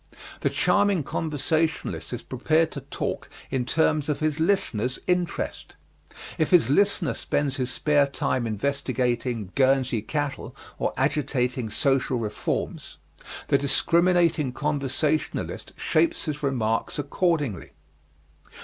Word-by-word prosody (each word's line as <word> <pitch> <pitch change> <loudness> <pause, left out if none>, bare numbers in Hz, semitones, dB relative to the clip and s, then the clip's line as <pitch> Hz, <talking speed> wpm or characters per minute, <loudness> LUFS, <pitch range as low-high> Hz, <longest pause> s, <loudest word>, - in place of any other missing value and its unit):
The - - +1
charming 205 -5 +2
conversationalist 155 +2 -1
is 120 -1 -5
prepared 155 +5 +1
to 140 - -6
talk 135 - -4 0.2
in 130 -2 0
terms 155 +1 +1
of 150 - 0
his 155 0 0
listener's 130 - +1
interest. 180 -1 -2 0.6
If 155 - +2
his 165 -9 +5
listener 195 -2 +2
spends 140 -2 -1
his 130 -1 -1
spare 145 0 +3
time 130 -3 -1
investigating 120 -2 -1
Guernsey 130 -3 +2
cattle 145 +3 -3 0.2
or - - 0
agitating 130 -4 0
social 135 +2 +1
reforms, 105 -3 -3 0.5
the 140 - +4
discriminating 170 0 +2
conversationalist 150 +1 -2
shapes 330 -1 +1
his 150 -1 -3
remarks 115 -6 0
accordingly. 145 - -1
140 Hz, 110 wpm, -25 LUFS, 125-155 Hz, 0.6 s, his